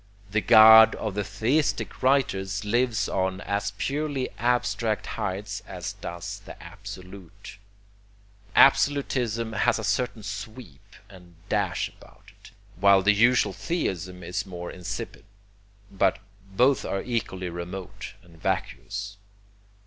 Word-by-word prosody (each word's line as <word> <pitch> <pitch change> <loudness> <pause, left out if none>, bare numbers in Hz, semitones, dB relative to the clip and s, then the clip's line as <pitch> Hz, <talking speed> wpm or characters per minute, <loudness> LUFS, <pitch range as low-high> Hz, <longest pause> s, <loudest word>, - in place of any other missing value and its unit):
The 110 +1 +1
God 110 +1 +8
of 110 -3 -4
the 105 +1 -2
theistic 110 +10 -1
writers 105 -7 +1
lives 115 -1 +1
on 95 0 -1
as 100 0 -2
purely 145 -1 -2
abstract 120 -2 0
heights 105 +2 -4
as - - -6
does 85 0 -7
the - - -11
Absolute. 90 0 -11 1.0
Absolutism 125 -5 +3
has 105 - +2
a 110 - -5
certain 110 +2 -1
sweep 105 - -9
and 90 -3 -16
dash - - 0
about - - -19
it, - - -18 0.3
while 100 0 +5
the 105 +2 +5
usual 120 +4 +3
theism 90 - -3
is 85 +1 -3
more 90 -3 -7
insipid, 90 -2 -6 0.7
but 95 -1 +2 0.3
both 125 +7 +3
are 95 - -3
equally 95 -7 -3
remote 90 +4 -7
and 85 -2 -19
vacuous. 100 0 -3
105 Hz, 120 wpm, -26 LUFS, 95-120 Hz, 1.0 s, God